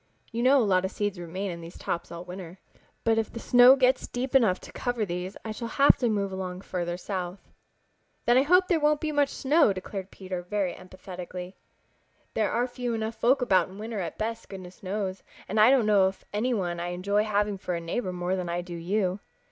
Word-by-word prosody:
You 230 0 -2
know 260 +3 +6
a 245 - +3
lot 185 -2 +3
of 190 - -1
seeds 205 -2 -3
remain 185 +3 -4
in 170 0 -7
these 165 +1 -10
tops 170 - -4
all 170 +1 -7
winter. 180 0 -8 0.5
But 225 -1 +3
if 220 - -2
the 230 - -7
snow 245 +2 +7
gets 260 -1 +2
deep 250 +1 -4
enough 225 -9 +4
to - - -11
cover 245 -3 -2
these 180 +1 -5
I 220 - -3
shall 230 +2 -5
have 275 +4 +5
to 245 -3 +1
move 200 -2 0
along 185 -1 -5
farther 175 -2 -3
south." 185 0 -5 0.8
"Then 240 - +4
I 260 - +6
hope 360 +6 +4
there 340 -3 +2
won't 300 0 +3
be 310 0 -2
much 290 -2 +2
snow," 290 -5 +3
declared 190 0 -6
Peter 185 -2 -6
very 190 0 -1
emphatically. 180 0 -8 0.8
"There 215 -2 +1
are 240 - +1
few 245 -1 -3
enough 220 0 -2
folks 250 +3 +2
about 185 -7 +3
in 190 - -12
winter 220 0 -4
at 175 - -4
best, 225 +1 -4
goodness 185 -2 -10
knows, 195 0 -3 0.3
and 215 +3 0
I 215 +3 +8
don't 260 -4 +4
know 205 -3 +5
of 190 0 -3
any 225 +5 0
one 175 -4 -2
I 175 - -3
enjoy 200 +4 +1
having 205 -1 0
for 180 -1 -3
a - - -2
neighbor 185 +4 -3
more 180 +1 -1
than 180 -2 -3
I 175 +1 -1
do 175 0 -9
you." 185 +3 -1
200 Hz, 220 wpm, -27 LUFS, 180-235 Hz, 0.8 s, I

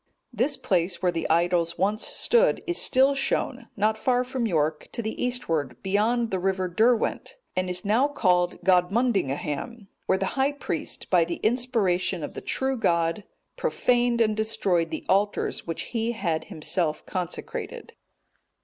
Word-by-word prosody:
This 255 +6 0
place 180 -1 0
where 180 - +3
the 165 -1 -3
idols 170 0 +2
once 205 +5 0
stood 485 +1 +2
is 350 -1 +1
still 265 +2 +4
shown, 270 -2 -2
not 215 +2 +1
far 250 0 +2
from 250 -2 -2
York, 155 -4 -1
to - - -3
the 220 - -3
eastward, 165 - -1
beyond 220 +4 +1
the 190 - 0
river 190 0 0
Derwent, 220 +6 +1 0.2
and 185 0 -1
is 180 +1 -4
now 230 +7 +3
called 180 -11 +1
Godmunddingaham,(231) 190 - 0 0.2
where 190 - +3
the 195 - -1
high 270 +7 0
priest, 285 - -5
by 175 -3 +5
the 170 +1 -4
inspiration 210 - +1
of - - -5
the - - -7
true 265 0 -1
God, 170 -1 +1 0.3
profaned 240 -1 +1
and 215 -1 +2
destroyed 190 -6 +1
the - - -5
altars 200 -1 0
which 165 - -3
he 230 0 0
had 170 -8 -2
himself 155 0 -1
consecrated. 180 -3 -5
200 Hz, 150 wpm, -26 LUFS, 175-240 Hz, 0.3 s, by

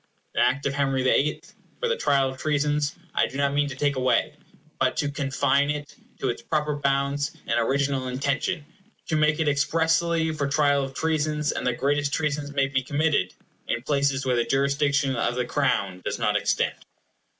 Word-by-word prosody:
The - - -1
Act 130 +3 +2
of 140 - 0
Henry 135 -2 0
the 130 - +4
Eighth, 150 +2 -1 0.3
for 485 - 0
the 475 - +1
Trial 140 - +2
of 130 0 -9
Treasons, 150 0 0 0.2
I - - +2
do 135 - -8
not 140 0 +1
mean 145 0 +1
to 130 - -6
take 140 0 0
away, 130 +3 +1 0.5
but 130 -1 +1
to 145 -1 0
confine 140 +1 +1
it 150 -1 -4 0.3
to 135 - 0
its 120 - -3
proper 150 +2 -1
bounds 140 0 0
and 115 - +1
original 135 +2 0
intention; 140 +5 -1 0.4
to 160 - +1
make 155 0 +2
it 160 - +1
expressly 160 +3 +2
for 145 -2 -1
trial 145 -1 +2
of 135 0 -6
treasons—and 155 -3 0
the 125 - +2
greatest 145 +3 0
treasons 150 -2 -1
may 140 -1 +1
be 135 -1 0
committed—in 145 - -2
places 140 -1 +1
where 125 -1 +2
the 120 - +2
jurisdiction 140 +1 +1
of 120 0 0
the 125 0 -1
Crown 100 -9 0
does - - -2
not - - +1
extend. - - +1
140 Hz, 185 wpm, -25 LUFS, 135-150 Hz, 0.5 s, the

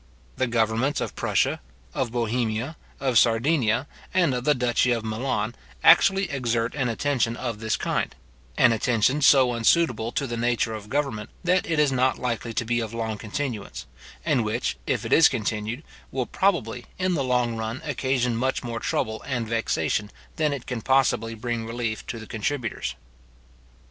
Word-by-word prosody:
The 130 - +1
governments 115 +4 +1
of - - -4
Prussia, - - +1 0.3
of 120 - -1
Bohemia, 120 +3 -1 0.2
of 130 -5 +3
Sardinia, 120 +1 +2 0.3
and 175 -7 +3
of 125 0 -3
the 150 - +4
duchy 125 0 +2
of 115 -2 0
Milan, 110 -1 -1 0.3
actually 195 0 +6
exert 120 -3 -1
an 135 -4 -1
attention 115 -1 0
of 115 -4 -4
this 110 0 -1
kind; - - -2 0.4
an 125 - +6
attention 120 +5 +2
so 135 -3 +6
unsuitable 115 -1 +2
to 140 - 0
the 120 -2 -4
nature 115 -1 0
of 105 -1 -7
government, 135 -6 -2
that 180 0 +2
it 165 - +1
is 150 -2 +4
not 130 0 +2
likely 115 -1 -3
to 115 +1 -2
be 120 +1 +1
of 115 -1 -4
long 110 -2 -3
continuance, 115 0 -4 0.4
and 145 -7 +2
which, 110 +3 -1
if - - 0
it - - 0
is 160 - +7
continued, 110 +5 -3 0.3
will 130 -2 -1
probably, 125 - 0
in 185 -1 +1
the 145 -5 0
long 125 -2 +1
run, 110 +3 -3
occasion 130 -4 0
much 130 +4 -1
more 115 -1 -4
trouble 110 0 -2
and 120 -4 -2
vexation 115 -2 0 0.3
than 155 -2 +1
it 140 -4 -4
can 125 -3 -4
possibly 115 -3 +2
bring 115 0 -3
relief 115 -1 -3
to 115 - -4
the 110 - -8
contributors. 115 +2 -3
120 Hz, 170 wpm, -25 LUFS, 115-135 Hz, 0.4 s, is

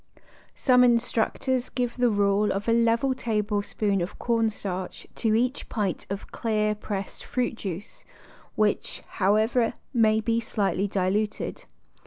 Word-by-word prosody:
Some 250 -2 +5
instructors 245 +1 +1
give 245 -2 -2
the 245 -1 +3
rule 205 0 +2
of 200 +3 -3
a 230 - +4
level 235 +3 +3
table 215 -4 -1
spoon 200 -1 -1
of 175 - -4
cornstarch 210 -5 -2
to 220 -2 +2
each 250 +4 0
pint 205 -6 -2
of 200 0 -5
clear, 215 -2 0
pressed 205 -2 -5
fruit 250 -1 -1
juice, 200 -3 -7 0.5
which, 210 -1 0 0.2
however, 220 +4 +3 0.2
may 220 -3 +4
be 230 +1 +1
slightly 205 -3 -1
diluted. 200 +2 -1
215 Hz, 130 wpm, -26 LUFS, 205-235 Hz, 0.5 s, Some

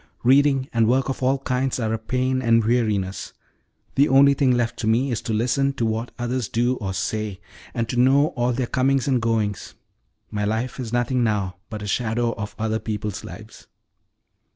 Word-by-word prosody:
Reading 135 +1 +4
and 115 -2 +3
work 130 +3 +2
of 135 - -4
all 130 +2 +2
kinds 130 0 -1
are 110 -2 -1
a 115 - -2
pain 130 +3 -1
and 115 -2 +3
weariness. 105 -5 0 0.6
The 140 +2 +3
only 140 +1 +6
thing 140 -1 +2
left 120 -2 0
to 110 - -2
me 125 +5 +2
is 115 - -2
to - - -4
listen 125 +5 +1
to 120 -4 -1
what 115 +2 -2
others 120 -1 -2
do 120 +2 +1
or 100 -4 -4
say, 105 0 -3 0.4
and 115 -1 -1
to 120 - -4
know 140 +4 +4
all 120 -6 -1
their 125 +1 -1
comings 130 +2 +1
and 130 -3 +2
goings. 110 -3 -1 0.6
My 105 0 -2
life 110 +6 -2
is 120 -3 -5
nothing 120 +1 +1
now 100 -5 -1
but 105 -2 -6
a - - -5
shadow 115 +2 0
of 105 0 -6
other 110 0 -1
people's 105 -2 -4
lives." - - -11
120 Hz, 190 wpm, -23 LUFS, 110-130 Hz, 0.6 s, only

